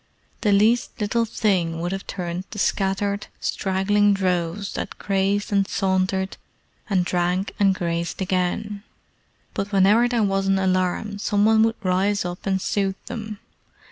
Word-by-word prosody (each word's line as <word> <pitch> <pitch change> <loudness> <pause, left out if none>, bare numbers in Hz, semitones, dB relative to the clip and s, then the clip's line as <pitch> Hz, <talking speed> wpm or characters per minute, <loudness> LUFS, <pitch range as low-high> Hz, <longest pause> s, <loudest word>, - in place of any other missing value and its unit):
The 210 - +2
least 220 +5 +2
little 230 +2 +1
thing 185 -7 0
would 175 +1 -2
have 195 0 -5
turned 180 -1 -4
the 225 - -9
scattered, 200 0 0
straggling 200 +2 +2
droves 185 0 -1
that - - -5
grazed 200 +2 0
and 200 -1 +2
sauntered 190 0 0 0.5
and 185 -3 +2
drank 180 +2 0
and 195 -2 +4
grazed 170 -1 -2
again; 190 +2 -1 0.7
but 200 +1 -3
whenever 205 +5 +5
there 240 -2 +1
was 195 -1 +1
an 195 0 +3
alarm 190 +2 0
some 205 -1 +2
one 220 0 +5
would 225 0 +3
rise 190 +2 +1
up 175 +2 -5
and 190 -1 +1
soothe 195 0 -1
them. 220 -3 -6
195 Hz, 145 wpm, -23 LUFS, 185-205 Hz, 0.7 s, whenever